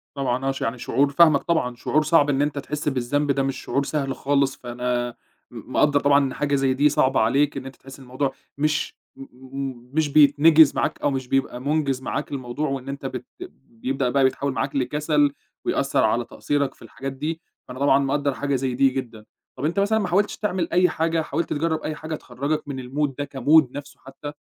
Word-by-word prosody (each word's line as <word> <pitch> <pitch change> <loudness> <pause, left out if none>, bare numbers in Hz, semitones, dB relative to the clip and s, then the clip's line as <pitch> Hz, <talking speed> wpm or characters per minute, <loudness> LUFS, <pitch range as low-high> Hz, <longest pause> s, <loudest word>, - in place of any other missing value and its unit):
طبعًا 130 -1 -1
آه، 135 - +2
ش 135 - -7
يعني 115 +2 -2
شعور 140 +3 +1
فاهمك 155 -2 +5
طبعًا، 160 -8 0
شعور 155 +5 +1
صعب 150 -1 +4
إن 140 0 +1
أنت 145 -1 -1
تحس 150 +1 -3
بالذنب 140 +2 0
ده 135 0 +1
مش 135 -1 -2
شعور 140 - -1
سهل 140 -3 -2
خالص، 140 -1 +1
فأنا 120 0 -2 0.4
م - - -10
مقدّر 145 -1 +3
طبعًا 140 0 +4
إن 130 - -3
حاجة 145 -1 0
زي 135 -1 +2
دي 145 +3 +3
صعبة 135 -2 +2
عليك، 140 +6 +2
إن 135 - -6
أنت 135 0 -9
تحس 135 +1 -13
إن - - -12
الموضوع 130 +2 -2 0.2
مش 150 0 0 0.2
م - - -13 0.4
م 130 -2 -6
مش 155 -1 +1
بيتنِجِز 150 +1 +6
معاك - - -1
أو 145 - +1
مش 130 -2 -3
بيبقى 135 -1 0
مُنجِز 140 -2 0
معاك 130 - -4
الموضوع، 135 +2 -3
وإن 135 -1 -4
أنت 140 0 -6
بت 130 -2 -5 0.4
بيبدأ 125 +2 -2
بقى 135 +1 +2
بيتحوّل 130 +1 +1
معاك - - -2
لكَسَل 145 +1 +1 0.3
ويأثّر - - +1
على - - +1
تقصيرك 145 -2 -2
في - - -28
الحاجات 130 +4 -7
دي، 155 +5 -4 0.3
فأنا 125 +1 -8
طبعًا 140 0 +4
مقدّر 140 +1 0
حاجة 140 +1 -1
زي 130 -1 -1
دي 135 +1 +4
جدًا، 120 -5 -6 0.3
طَب 130 - -4
أنت 170 +6 0
مثلًا 220 +2 +2
ما 200 - -1
حاولتش 200 +4 +1
تعمل 185 -5 -1
أي 180 +1 +4
حاجة، 165 0 0
حاولت 160 +2 -3
تجرّب 160 +1 -1
أي 155 - -3
حاجة 155 +1 -5
تخرّجك 145 +3 -3
من 135 -2 -5
الmood 145 +2 0
ده 145 -1 -4
كmood 145 0 +5
نفسُه 145 +1 -9
حتى؟ 135 +2 -9
140 Hz, 210 wpm, -23 LUFS, 130-150 Hz, 0.4 s, بيتنِجِز